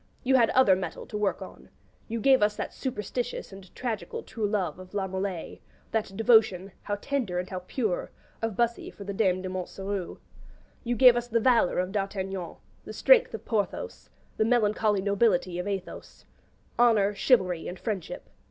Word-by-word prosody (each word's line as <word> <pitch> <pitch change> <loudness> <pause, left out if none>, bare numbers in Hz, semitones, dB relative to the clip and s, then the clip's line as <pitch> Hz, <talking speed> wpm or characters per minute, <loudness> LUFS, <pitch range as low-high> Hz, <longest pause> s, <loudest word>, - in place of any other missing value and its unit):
You 265 0 +2
had 235 -3 +5
other 255 -8 +5
metal 185 0 -5
to - - -9
work 210 -1 -1
on: - - -13 0.4
you 230 0 -3
gave 265 +2 +4
us 210 0 +2
that - - -5
superstitious 245 -2 -4
and 195 -1 -12
tragical 230 -5 -4
true 220 -2 -3
love 185 -6 -2
of 185 +2 -12
La 195 -1 0
Molés, 190 -2 -4 0.3
that 210 -3 -2
devotion 215 -4 +4
how 205 - -2
tender 225 -4 -2
and 180 +1 -2
how 185 - -3
pure! 185 +1 -2 0.3
of 225 -3 -2
Bussy 235 +1 0
for 200 - -11
the 200 0 -5
Dame 185 -2 +1
de 185 - -4
Montsoreau. 190 +1 -4 0.7
You 240 -1 -1
gave 250 +1 +7
us 240 0 -2
the 230 -1 +1
valour 235 -5 +3
of 180 +1 0
D'Artagnan, 195 -2 -3 0.3
the - - -8
strength - - +4
of - - -9
Porthos, 225 - -3 0.3
the - - +3
melancholy 215 -3 +2
nobility 200 -3 +1
of 180 - -3
Athos: 195 -2 -6 0.5
Honour, 215 -4 +4
Chivalry, 185 -6 +2
and 180 - -6
Friendship. 200 -6 -5
205 Hz, 170 wpm, -27 LUFS, 190-230 Hz, 0.7 s, gave